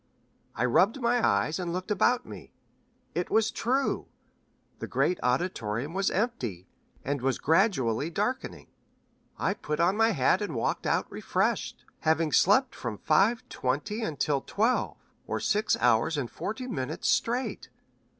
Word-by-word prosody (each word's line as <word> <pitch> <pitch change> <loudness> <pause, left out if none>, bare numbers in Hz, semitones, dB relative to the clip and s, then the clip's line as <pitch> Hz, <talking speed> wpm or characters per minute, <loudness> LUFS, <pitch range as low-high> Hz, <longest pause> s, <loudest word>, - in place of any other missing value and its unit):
I 120 - +1
rubbed 195 - +3
my 240 -1 +1
eyes, 100 - +2
and 175 -2 -3
looked 185 +4 -4
about 240 +5 +2
me. - - -11 0.6
It - - -2
was 220 0 +2
true 265 +4 0 0.7
the - - -5
great 180 - +1
auditorium 125 - -1
was 195 +1 +1
empty, 125 - -2 0.4
and 140 -1 -1
was 135 -1 0
gradually 155 - +2
darkening. 210 +9 -3 0.7
I - - 0
put 150 -6 -4
on 175 +4 +3
my 225 +1 +4
hat 180 - +2
and 190 -9 -3
walked 115 - -1
out - - +1
refreshed, - - -1
having 160 0 +1
slept 250 - +4
from 115 -4 -5
five 205 - +2
twenty 150 - -2
until 150 -7 -1
twelve, 225 - 0 0.3
or - - -2
six 210 +1 +1
hours 120 +5 +3
and 130 -5 -3
forty 240 +5 -5
minutes 130 - -3
straight. 245 +3 0
175 Hz, 140 wpm, -28 LUFS, 130-220 Hz, 0.7 s, my